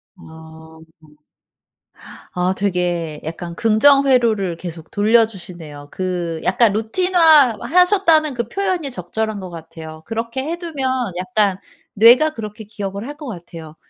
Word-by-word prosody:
아. 160 -2 -14 1.6
아 180 +1 0
되게 175 -5 -2
약간 170 +2 -7
긍정 275 +7 +4
회로를 220 -9 +1
계속 165 -2 -9
돌려 220 +3 +4
주시네요. 170 -8 -11
그 175 -3 -4
약간 200 +3 +2
루틴화 310 - +4
하셨다는 335 0 +3
그 235 -2 -4
표현이 370 -5 -2
적절한 220 +2 -4
것 185 -2 -8
같아요. 160 -1 -11
그렇게 230 +3 -4
해 330 +4 -4
두면 315 -7 -3 0.3
약간 185 +1 0 0.4
뇌가 240 +9 +6
그렇게 215 0 -7
기억을 200 0 -6
할 290 +1 -8
것 300 - -9
같아요. 170 -6 -10
210 Hz, 265 characters per minute, -19 LUFS, 175-265 Hz, 1.6 s, 뇌가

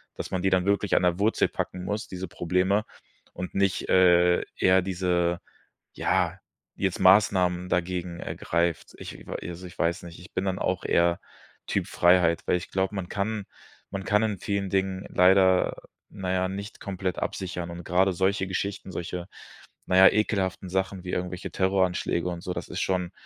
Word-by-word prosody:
dass - - -6
man 95 - -1
die 95 - +2
dann 90 -1 +2
wirklich 100 0 +1
an - - +3
der 90 0 +2
Wurzel 110 +3 +2
packen 90 0 -4
muss, 105 +2 -3
diese 95 0 -6
Probleme, 90 +5 +1 0.5
und 90 - -6
nicht, 100 -1 +1
äh, 90 -1 +5
ja 95 0 +4
diese 90 -2 0 0.5
ja, 95 -1 0 0.4
jetzt - - -1
Maßnahmen 90 -2 +4
dagegen 90 -1 -2
ergreift. 85 -2 -2
Ich - - -9
w - - -6 0.2
also, 90 +2 -8
ich 90 - -13
weiß 85 +3 0
nicht, 85 0 -10
ich 90 - -14
bin 95 - -1
dann 95 -1 -1
auch 95 -2 -1
eher 85 0 +2 0.5
Typ - - -1
Freiheit, 85 -1 +4
weil - - +2
ich 90 - -6
glaube, 95 +1 -1
man 95 -3 -4
kann 105 +2 -2 0.5
man 95 0 -5
kann 105 +2 +2
in 105 -3 -1
vielen 100 -2 -2
Dingen 95 0 -1
leider, 95 0 +4 0.3
na 95 -2 -4
ja, 95 0 +1
nicht 100 +3 -7
komplett 95 -3 -3
absichern. 90 -2 -4
Und 85 0 -8
grade 95 +2 +2
solche 95 +2 +1
Geschichten, 95 +1 -3
solche, 85 +1 -5 0.6
na 90 - 0
ja, 95 0 +9
ekelhaften 95 -3 -1
Sachen 95 0 -2
wie 90 - -5
irgendwelche 90 0 -3
Terroranschläge 95 -2 +1
und 85 -1 -5
so, 90 - -4
das - - -5
ist - - -3
schon 90 -2 -1
95 Hz, 175 wpm, -26 LUFS, 90-95 Hz, 0.6 s, ja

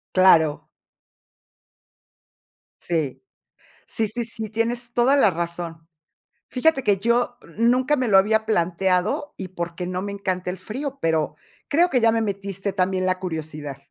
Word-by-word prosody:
Claro. 165 -5 +5 2.1
Sí. 160 -6 -2 0.7
Sí, 220 - -1
sí, 235 +3 -2
sí, 225 -2 -5
tienes 235 +2 -2
toda 250 +4 +4
la 215 -8 +5
razón, 170 -1 -5 0.6
fíjate 270 +1 +2
que 200 -1 +3
yo 240 +3 +1 0.2
nunca 250 +5 +3
me 255 -4 -1
lo 195 - +6
había 220 +3 +3
planteado 185 - 0
y 190 -2 -6
porque 175 0 -5
no 185 0 -3
me 200 +1 -4
encanta 185 -2 -3
el 185 - -4
frío, 270 - -6
pero 160 -2 0 0.3
creo 340 +5 +4
que 255 -5 +2
ya 225 0 +5
me 230 - +1
metiste 200 -1 -3
también 185 -1 0
la 185 0 0
curiosidad. 155 -5 -5
195 Hz, 140 wpm, -23 LUFS, 175-235 Hz, 2.1 s, lo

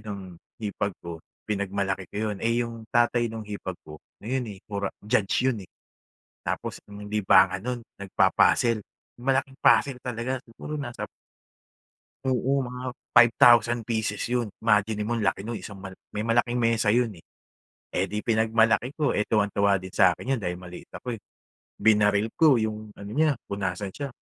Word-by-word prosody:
nung 100 -4 -8 0.2
hipag 100 -3 -3
ko, 85 -1 -6 0.2
pinagmalaki 100 -2 -2
ko - - -10
'yon. 105 - -4
Eh, 115 +2 +1
'yong 115 -1 -7
tatay 120 0 +2
no'ng 110 -1 -6
hipag 100 -3 -6
ko, 75 0 -11 0.2
ngayon, 125 +3 -1
eh, - - -15
pora 100 -1 -3 0.2
judge 110 +1 +1
'yon, 120 -6 +1
eh. - - -59 0.8
Tapos, - - -3
ang 105 0 -10
libangan 95 -2 +4
no'n 125 -1 -3 0.2
nagpa-puzzle, 105 +3 +3 0.3
'yong 120 - -12
malaking 135 0 +1
puzzle 135 -3 +5
talaga 125 +2 -2
siguro 125 +6 -7
nasa 120 -4 -5 1.2
Oo, 130 +1 +1
mga 125 0 -7 0.3
5,000 120 -1 +6
pieces 110 -3 -1
'yon, 120 -3 0
imaginin 105 -1 +2
mo 120 - -2
ang 105 - -1
laki 95 +2 0
no'n, 115 -1 -4
isang 100 - -9
mal 95 0 -9 0.2
may 105 +1 -2
malaking 120 +1 +2
mesa 115 -2 +2
'yon, 115 +1 +3
eh. 85 - -16 0.7
Eh, 95 - +1
'di 105 0 -3
pinagmalaki 115 +3 +2
ko 150 -5 +1
tuwang-tuwa 100 -2 +2
din 95 0 -9
sa 95 -3 +6
akin 135 +7 -2
'yon - - -6
dahil 90 -1 -2
maliit 90 -1 -10
ako, 125 -2 -5
eh, 100 - -17 0.6
binaril 105 -1 +3
ko 155 -6 +6
'yong 110 -1 -4
ano 100 0 -9
niya 150 0 +2
kung 100 0 -4
nasaan 95 0 -3
siya, 140 -1 -4
110 Hz, 165 wpm, -26 LUFS, 100-120 Hz, 1.2 s, 5,000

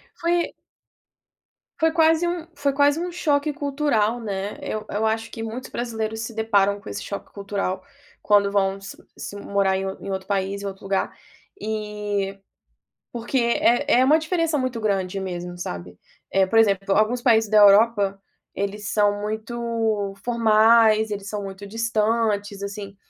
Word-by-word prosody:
Foi 340 0 0 1.3
foi 320 0 +3
quase 325 +1 +4
um 345 -1 -3
foi 285 -1 0
quase 285 +2 +3
um 355 +1 -2
choque 300 -4 0
cultural, 275 -6 0
né, 200 -2 -4
eu 215 0 -4
eu 215 +2 0
acho 225 +1 -1
que 225 - -7
muitos 225 +3 -6
brasileiros 220 -2 -3
se 230 +1 -5
deparam 200 -3 +2
com - - -9
esse 100 +1 -5
choque 200 - -7
cultural 200 -2 -3 0.4
quando 205 -1 +3
vão 195 -1 +1
se 195 - -9 0.2
se - - -7
morar 200 -1 0
em 190 - -3 0.2
em 195 - -5
outro 190 0 -4
país, 200 0 -1
em - - -6
outro 195 -1 -7
lugar, 195 0 0 0.5
eh, 210 -2 -3 0.8
porque 240 +3 -4
é 245 +3 +3
é - - +5
uma 300 +4 +5
diferença 330 -1 0
muito 255 -4 -2
grande 195 -2 -1
mesmo, 175 -1 -5
sabe. 90 - -6 0.3
Eh, 190 0 +4
por 225 +4 +2
exemplo, 195 -2 +3
alguns 220 +4 +2
países 225 -4 +3
da 215 - +5
Europa, 205 -1 +5 0.4
eles 200 +1 -3
são 205 -1 +2
muito 220 -1 -2
formais, 220 -1 +4
eles 200 -1 -5
são 210 -1 -4
muito 195 +1 -8
distantes, 215 -2 0
assim, 200 0 -6
215 Hz, 155 wpm, -23 LUFS, 200-235 Hz, 1.3 s, é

